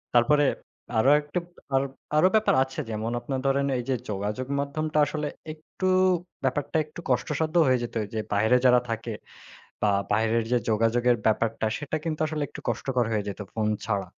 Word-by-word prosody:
তারপরে 145 +5 +5 0.5
আরো 130 +5 +4
একটু, 150 +5 -3 0.3
বেপ 135 0 +2 0.3
আরও 185 +4 +6
ব্যাপার 220 - +4
আছে। 135 0 -8
যেমন 110 +1 -3
আপনার 130 +1 -3
ধরেন 140 +1 +2
এই - - -3
যে 130 - +2
যোগাযোগ 105 +6 -3
মাধ্যমটা 155 +2 -2
আসলে 150 0 -3 0.3
একটু 160 +4 -5 0.6
ব্যাপারটা 145 +4 0
একটু 155 +2 -12
কষ্টসাধ্য 155 +2 0
হয়ে 130 -1 +3
যেত। 120 - -6 0.2
যে 110 - -1
বাইরে 110 +5 +4
যারা 125 -1 +7
থাকে 115 0 -3 0.7
বা 105 - +3 0.2
বাইরের 110 +2 +2
যে, 125 - +4
যোগাযোগের 115 +3 +3
ব্যাপারটা 110 0 +1
সেটা 150 +1 -3
কিন্তু 155 -2 -2
আসলে 150 -1 -2
একটু - - -9
কষ্টকর 125 +1 0
হয়ে 105 -2 0
যেত 100 - -5
ফোন 110 -1 0 0.2
ছাড়া। 100 -4 -1
125 Hz, 165 wpm, -26 LUFS, 110-145 Hz, 0.7 s, যারা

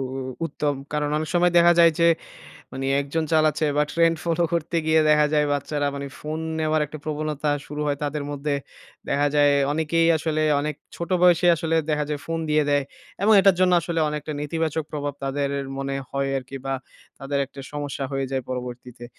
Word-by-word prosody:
উ - - -3 0.3
উত্তম। 150 -3 -2 0.2
কারণ 150 -1 0
অনেক 155 0 -3
সময় 175 0 +4
দেখা 170 0 +7
যায় 170 -1 +7
যে 170 - +5 0.7
মানে 135 - -5 0.2
১ 140 - -5
জন 160 -1 +1
চালাচ্ছে 155 0 +3
বা 150 - +4
ট্রেন্ড 165 0 +3
ফলো 170 0 +1
করতে 170 0 -1
গিয়ে 160 0 +4
দেখা 150 0 +5
যায় 150 -1 +3
বাচ্চারা 145 0 -1
মানে 140 0 -5
ফোন 155 +1 -4 0.2
নেওয়ার 155 0 +1
একটা 155 +1 -9
প্রবণতা 155 -1 -2 0.2
শুরু 150 +1 -6
হয় 145 -1 0
তাদের 145 0 -2
মধ্যে 145 0 -2 0.5
দেখা 145 +1 +2
যায় 145 -1 +5 0.2
অনেকেই 160 +2 +1
আসলে 155 0 -1 0.2
অনেক 150 0 -2 0.2
ছোট 170 +2 -5
বয়সেই 175 0 +5
আসলে 165 0 -1 0.2
দেখা 150 -1 +1
যায় 150 -1 -2
ফোন 165 0 -2
দিয়ে 150 0 +4
দেয়। 145 -1 +3 0.4
এবং 220 +2 +5
এটার 190 -2 +5
জন্য 180 -1 +4
আসলে 165 0 -2
অনেকটা 150 0 -4
নেতিবাচক 160 +1 -2
প্রভাব 145 -1 -3
তাদের 140 +1 -1 0.3
মনে 135 0 -3 0.2
হয় 140 0 -1
আরকি 135 +1 -8
বা 135 - -1 0.4
তাদের 140 +1 -2
একটা 140 0 -11
সমস্যা 145 -2 -4
হয়ে 135 0 -1
যায় 130 -1 -1
পরবর্তীতে। 125 -1 -6
150 Hz, 190 wpm, -24 LUFS, 140-160 Hz, 0.7 s, দেখা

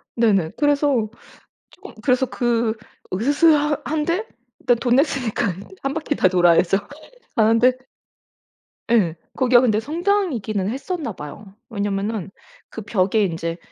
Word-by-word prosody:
네네. 200 -8 +2
그래서 285 -6 +2 0.6
쪼금 405 +2 -13
그래서 255 +1 +2
그 235 -3 0 0.4
으스스하 290 - +3
한데 335 +7 -1 0.4
그 245 - +5
돈 245 +1 +1
냈으니까 250 - 0 0.3
1 275 - -1
바퀴 315 -2 -2
다 - - +3
돌아야죠. 175 0 +4 0.6
가는데 230 +3 +4 1.2
예. 200 -9 +3 0.2
거기가 250 -2 +4
근데 215 -4 +2
성당이기는 290 - -1
했었나봐요. 225 - -6
왜냐하면은 200 -2 -3 0.4
그 225 - -7
벽에 205 0 +1
인제 165 -1 -3
235 Hz, 260 characters per minute, -21 LUFS, 200-285 Hz, 1.2 s, 그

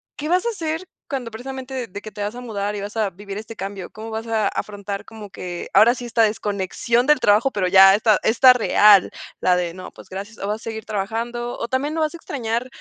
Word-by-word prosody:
¿qué 300 +1 -5
vas 360 +3 +2
a 470 - +2
hacer, 330 -4 -3 0.2
cuando, 255 -6 -4
precisamente, 260 +1 -6
de 205 +2 -8
que 215 - -8
te 205 - -8
vas 205 +3 -3
a - - -7
mudar 210 -3 -3
y 200 - -4
vas 205 +2 -7
a 215 -2 +1
vivir 200 +2 -9
este 220 +1 -9
cambio? 195 -1 -6
¿Cómo 220 +1 -9
vas 225 +1 -5
a 220 -2 +1
afrontar, 200 -1 -4
como 215 -2 -10
que 175 -1 -6
ahora 235 +3 +6
sí, 245 -1 -7
esta 230 -1 +1
desconexión 210 +3 0
del 300 0 +5
trabajo? 210 +6 +4
Pero 190 -5 0
ya 195 +1 +8
esta 215 -1 +3
esta 250 +3 +6
real, 210 -4 +5 0.3
la 180 -1 +4
de: 175 -1 -2
"No, 185 - -9
pues, - - -15
gracias". 200 +4 -7
¿O 200 - -5
vas 210 +1 -1
a - - -15
seguir 220 -1 -6
trabajando? 230 +4 -3
O 235 - -3
también, 275 +4 -1
¿no 325 - -1
vas 310 +1 0
a 340 - -7
extrañar 240 -5 -3
220 Hz, 240 wpm, -22 LUFS, 200-245 Hz, 0.3 s, ya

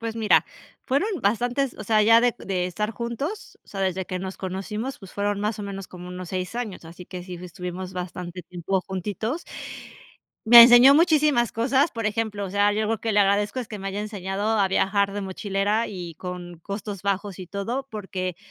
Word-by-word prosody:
Pues 230 0 -4
mira, 220 -2 +4 0.4
fueron 275 +9 +1
bastantes. 245 +5 0
O 215 - -6
sea, 215 +1 +3
ya 225 +2 +7
de 245 -1 +3
de 185 -2 -2
estar 210 +4 -2
juntos. 235 - -5
O - - -27
sea, 195 - -6
desde 190 -1 -1
que 185 - -3
nos 190 +1 -6
conocimos, 210 +7 -4
pues, 195 -3 -13
fueron 205 0 -1
más 210 +1 -1
o 210 - -4
menos, 195 -1 -6
como 180 -1 -10
unos 180 -1 -7
6 185 +1 -3
años. 225 -8 -5
Así 170 +2 -11
que 180 0 -8
sí, 180 0 -8
estuvimos 180 +1 -7
bastante 180 0 -6
tiempo 180 +2 -2
juntitos. 210 - -3 1.1
Me 235 0 +12
enseñó 245 +3 +9
muchísimas 300 - +4
cosas, 265 +6 +2
por 230 -3 -3
ejemplo, 210 -1 -2
o 190 - -5
sea, 205 +1 +3
yo 215 +1 0
lo 225 +1 0
que 225 - -1
le 210 - +2
agradezco 205 +3 +2
es 250 - -3
que 210 -2 -8
me 195 - -3
haya 195 +1 -4
enseñado 200 -1 -3
a 195 - +3
viajar 200 +1 +1
de 205 - -3
mochilera, 200 +3 -1
y 175 -5 -7
con 175 -1 -7
costos 200 +1 -6
bajos 200 -1 -2
y 180 - -8
todo. 235 +8 -3
Porque, 185 -4 -4
200 Hz, 200 wpm, -24 LUFS, 185-225 Hz, 1.1 s, Me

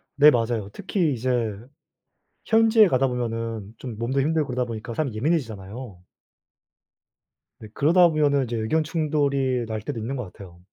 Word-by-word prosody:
네 150 +1 +7
맞아요. 115 -4 -1
특히 180 -6 -1
이제 125 +2 -3 1.2
현지에 225 -2 +5
가다 135 -1 +2
보면은 115 -4 -4
좀 120 -5 -7
몸도 130 +4 0
힘들고 155 0 0
그러다 125 0 -1
보니까 115 0 -6
사람 135 -6 -2
예민해지잖아요. 110 - -3 1.6
네. 110 - -10
그러다 175 +4 +5
보면은 145 -3 +2
이제 120 0 -4
의견 115 +9 0
충돌이 140 -6 0
날 110 -1 -4
때도 115 - -5
있는 125 +5 -4
것 110 -8 -6
같아요. 90 -4 -13
125 Hz, 335 characters per minute, -24 LUFS, 115-150 Hz, 1.6 s, 네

